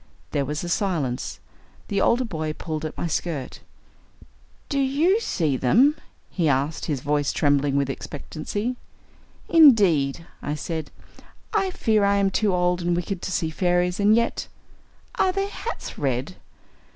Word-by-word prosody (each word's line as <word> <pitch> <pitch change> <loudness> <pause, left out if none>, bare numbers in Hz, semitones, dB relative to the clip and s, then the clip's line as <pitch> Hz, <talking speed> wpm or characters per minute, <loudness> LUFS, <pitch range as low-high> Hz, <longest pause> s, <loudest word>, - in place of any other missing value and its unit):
There 140 -1 0
was 150 +4 -3
a - - -4
silence. 170 -9 -1 0.5
The 200 - 0
older 245 +2 +3
boy 155 -7 -3
pulled 155 -1 -5
at 155 - -6
my - - -2
skirt. 155 -4 -3 1.1
"Do 280 - -1
YOU 300 +10 +3
see 155 - 0
them?" 255 - +4 0.4
he 170 -5 +1
asked, 140 +4 0
his 145 -5 -2
voice 145 0 0
trembling 145 -1 +2
with 140 -1 +2
expectancy. 165 - -4 0.7
"Indeed," 190 - +5 0.2
I 145 - -2
said, 160 0 -4 0.6
"I 395 -3 +2
fear 220 - +1
I 200 0 +3
am 200 -1 +2
too 210 +1 +1
old 180 0 +1
and 175 0 +1
wicked 180 +1 -3
to - - -4
see 160 -3 -1
fairies, 180 +1 +1
and 205 +2 +5
yet 235 0 0 0.7
are 375 - +4
their 390 +1 -2
hats 460 +3 -6
red?" 135 +5 -1
175 Hz, 150 wpm, -24 LUFS, 150-215 Hz, 1.1 s, Indeed